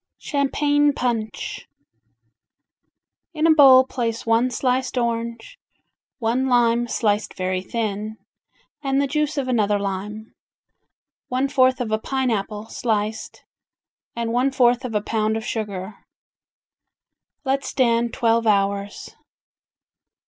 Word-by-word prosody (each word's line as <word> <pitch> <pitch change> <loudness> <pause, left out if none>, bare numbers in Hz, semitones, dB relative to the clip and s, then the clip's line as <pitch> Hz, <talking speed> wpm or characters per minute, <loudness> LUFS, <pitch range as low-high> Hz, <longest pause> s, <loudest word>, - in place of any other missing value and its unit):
Champagne 290 +1 +1
Punch 230 -4 -3 1.7
In 310 +1 +1
a 330 - +6
bowl 265 -4 +8
place 230 -3 -3
one 230 +2 +2
sliced 255 +1 -1
orange, 235 - -3 0.6
one 245 +3 0
lime 240 -1 +3
sliced 210 -2 -1
very 185 0 -2
thin, 215 0 -4 0.6
and 275 -1 0
the 280 - +2
juice 300 +2 -1
of 270 -2 -1
another 210 -5 +2
lime, 200 +2 -5 0.9
one 255 +2 0
fourth 260 -2 +3
of 235 -3 -3
a 215 - +1
pineapple 220 -5 -2
sliced, 220 -4 -3 0.7
and 230 -1 -2
one 250 +3 +2
fourth 245 -1 +3
of 230 -3 -5
a 210 - +2
pound 220 0 0
of 220 - -6
sugar. 200 -2 -4 1.5
Let 270 +1 0
stand 235 -3 +1
twelve 230 -2 +1
hours. 200 0 -1
235 Hz, 110 wpm, -22 LUFS, 215-260 Hz, 1.7 s, bowl